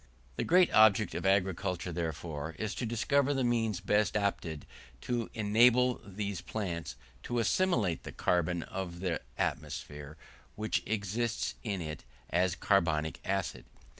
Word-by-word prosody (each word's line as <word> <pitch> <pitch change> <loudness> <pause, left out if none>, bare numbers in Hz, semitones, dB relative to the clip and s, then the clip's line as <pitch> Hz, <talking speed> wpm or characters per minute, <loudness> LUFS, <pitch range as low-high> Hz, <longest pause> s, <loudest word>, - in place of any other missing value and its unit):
The - - -1
great 180 +1 +4
object 110 -1 +5
of - - -2
agriculture, 95 -2 +1
therefore, 80 -2 -4
is 110 +1 -2
to 120 - -3
discover 140 +5 +2
the 135 - +1
means 115 -5 +1
best 105 +1 +1
adapted 95 -7 -1 0.4
to 120 - -2
enable 120 +4 +4
these 100 -2 -4
plants 85 - -4 0.3
to 120 - -3
assimilate 115 - +2
the - - -8
carbon 85 -1 0
of 90 -2 -6
the 90 -3 -1 0.2
atmosphere 75 +1 -4 0.4
which 110 +1 -1
exists 110 +2 -1
in 100 -5 -3
it 75 -2 -6 0.3
as 90 0 +2
carbonic 80 -6 +1
acid. 95 -1 -2
100 Hz, 135 wpm, -31 LUFS, 85-115 Hz, 0.4 s, object